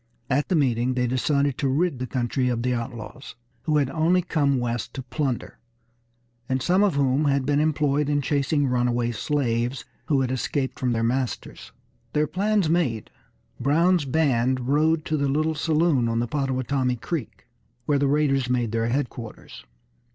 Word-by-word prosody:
At 145 +3 +1
the 185 - +2
meeting 125 -4 +1
they 125 -1 +1
decided 140 +2 0
to 140 - +1
rid 145 0 0
the 130 - -3
country 125 +1 -1
of 120 -1 -1
the 125 0 +1
outlaws, 115 0 -6 0.3
who 155 -2 +2
had 140 -3 +1
only 170 +4 +2
come 145 -5 +1
west 120 -2 -3
to 135 - -5
plunder, 130 -1 -3 0.9
and 130 0 +1
some 180 +9 +2
of 205 -7 +2
whom 140 +1 +2
had 140 -2 +1
been 145 +1 +2
employed 150 -1 +1
in 145 0 +2
chasing 145 +1 +1
runaway 120 -2 +1
slaves 120 0 -1 0.2
who 140 -3 +2
had 130 -1 -1
escaped 130 +1 -2
from 125 -2 0
their 115 0 0
masters. 125 +2 -3 0.4
Their 150 0 +2
plans 200 +2 +1
made, 155 -10 0 0.5
Brown's 165 +5 +3
band 130 -3 +1
rode 155 +3 +2
to 155 - 0
a 140 -1 0
little 155 +3 +1
saloon 155 -5 +1
on 115 - -1
the 120 - +1
Pottawatomie 130 -1 -1
Creek 130 +2 -5 0.4
where 145 0 +2
the 140 - +2
raiders 135 -3 +1
made 120 -3 0
their 115 0 0
headquarters. 120 - -5
135 Hz, 165 wpm, -24 LUFS, 125-150 Hz, 0.9 s, Brown's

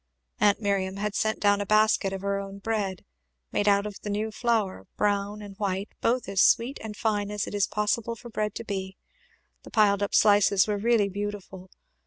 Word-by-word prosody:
Aunt 205 -1 +4
Miriam 195 -3 -1
had 210 0 -2
sent 215 +1 0
down 205 0 +3
a - - -2
basket 215 -2 +3
of 195 -1 -5
her 200 0 -1
own 195 0 -7
bread, 200 -3 -3 0.5
made 205 - 0
out 200 0 +4
of 210 -2 -7
the 210 - -5
new 215 +2 -2
flour, 215 - -1
brown 205 0 0
and 200 -1 -10
white, 200 0 -2
both 245 +2 +1
as 195 -2 +1
sweet 245 +4 +3
and 210 -2 -7
fine 205 -2 0
as 210 0 -2
it - - -8
is 205 0 +1
possible 215 +2 -1
for 240 +1 -12
bread 210 -1 -2
to - - -5
be; 190 -2 -5 0.6
the - - -13
piled 205 -3 +3
up 205 - -1
slices 205 -2 +5
were 210 -1 -1
really 225 -1 +3
beautiful. 200 -2 -6
205 Hz, 200 wpm, -26 LUFS, 200-215 Hz, 0.6 s, slices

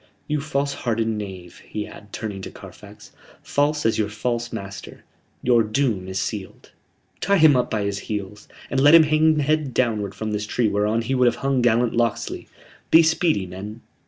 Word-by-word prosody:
You 150 -1 -1
false 140 -1 -1
hearted 115 -4 -1
knave," 95 -5 -6
he 105 -1 -6
added, 105 - -13
turning 105 -4 -5
to - - -7
Carfax, - - -13 0.3
"false 145 +1 0
as 115 - +2
your 105 -1 0
false 120 +2 -3
master 100 0 -8 0.4
your 120 -2 +4
doom 110 -4 -1
is 95 0 -3
sealed. 100 -1 -6 0.5
Tie 200 +1 +2
him 155 -4 +6
up 125 - +1
by 110 -2 -1
his 100 0 -2
heels, 105 -1 -6 0.2
and 135 - +1
let 145 +4 +7
him 165 - +9
hang 155 +1 +3
head 150 -2 0
downward 105 -6 0
from 110 +2 -4
this 105 0 -3
tree 120 +1 +1
whereon 105 +2 0
he 125 +4 -2
would 125 -1 +3
have 120 - +2
hung 135 -2 +2
gallant 120 0 +2
Locksley. 115 -1 -1 0.4
Be 165 - +7
speedy, 160 - +1
men." 100 +5 -8
115 Hz, 185 wpm, -23 LUFS, 105-140 Hz, 0.5 s, him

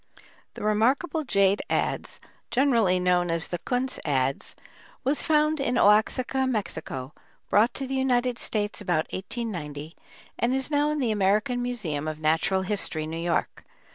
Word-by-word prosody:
] - - -31
The - - -7
remarkable 260 +10 +1
jade 200 -5 +2
adze, - - -1 0.3
generally 230 -9 +3
known 180 -1 +2
as 165 0 -1
the 175 - -3
"Kunz 250 +6 -2
adze," 135 -2 -1 0.5
was 275 +3 +1
found 305 0 +2
in 255 -2 0
Oaxaca, 250 +5 +3
Mexico, 150 - -4 0.4
brought 225 +4 +4
to 275 - -3
the 265 - -5
United 250 -2 +1
States 210 -1 -2
about 160 -3 0
1890, 170 - -5 0.4
and 245 +2 +2
is 265 +2 -3
now 295 0 +2
in 300 - -1
the 250 -6 +1
American 215 +5 +1
Museum 180 -12 -3
of 155 -1 -3
Natural 160 +5 +1
History, 185 -5 -1
New 160 +1 -5
York. 170 0 -1
215 Hz, 150 wpm, -26 LUFS, 175-255 Hz, 0.5 s, brought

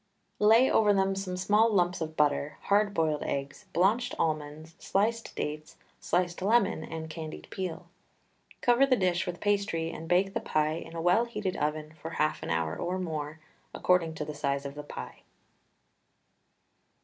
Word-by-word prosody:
Lay 225 +5 +6
over 210 -4 +4
them 195 0 +2
some 190 -2 -4
small 210 +4 +3
lumps 180 -3 +1
of 160 0 -4
butter, 150 0 +1
hard 205 +1 +2
boiled 160 -5 0
eggs, 140 +8 -4
blanched 225 +8 +2
almonds, 155 0 -2
sliced 225 +4 -1
dates, 150 +1 -4 0.2
sliced 175 0 0
lemon 205 -4 +2
and 160 0 -6
candied 155 -1 -7
peel. 185 -2 -4 0.8
Cover 245 +3 +4
the 260 - +4
dish 180 -4 0
with 175 -1 -4
pastry 200 -5 0
and 165 - -8
bake 190 +2 +3
the - - 0
pie 155 0 0
in 165 0 -7
a 165 - -3
well 180 +7 +4
heated 210 -5 -3
oven 150 +1 -2
for 160 - -5
half 155 0 +1
an - - -5
hour 80 -1 0
or 180 +2 -2
more, 155 -3 -4 0.3
according 170 -3 +2
to 150 - -4
the 150 - -5
size 140 -1 -2
of 140 - -5
the 150 - -7
pie. 145 - -9
175 Hz, 165 wpm, -29 LUFS, 155-200 Hz, 0.8 s, Lay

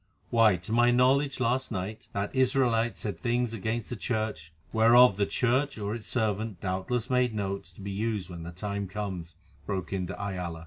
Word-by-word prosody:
Why, 115 -4 +5
to 90 +4 -7
my 120 +1 +5
knowledge 130 +3 +3
last 130 +1 0
night, 105 +2 -4
that 100 +1 -2
Israelite 125 -3 +2
said 100 -6 -4
things 120 +1 0
against 110 +1 -2
the - - -2
Church——" 110 -8 -3 0.2
"Whereof 115 0 +7
the 100 0 +1
Church, 130 +3 +1
or 105 0 -3
its 115 -2 -6
servant, 110 -4 -1
doubtless 105 +7 -2
made 125 -3 +2
notes 100 -3 -3
to 100 - -13
be 100 +1 -5
used 105 -2 -2
when 85 -2 -8
the 85 +1 -7
time 100 +2 -4
comes," 95 -4 -5 0.3
broke 95 -2 -3
in 95 -2 -1
de 90 0 -7
Ayala. 90 -5 -4
110 Hz, 185 wpm, -28 LUFS, 95-120 Hz, 0.3 s, Whereof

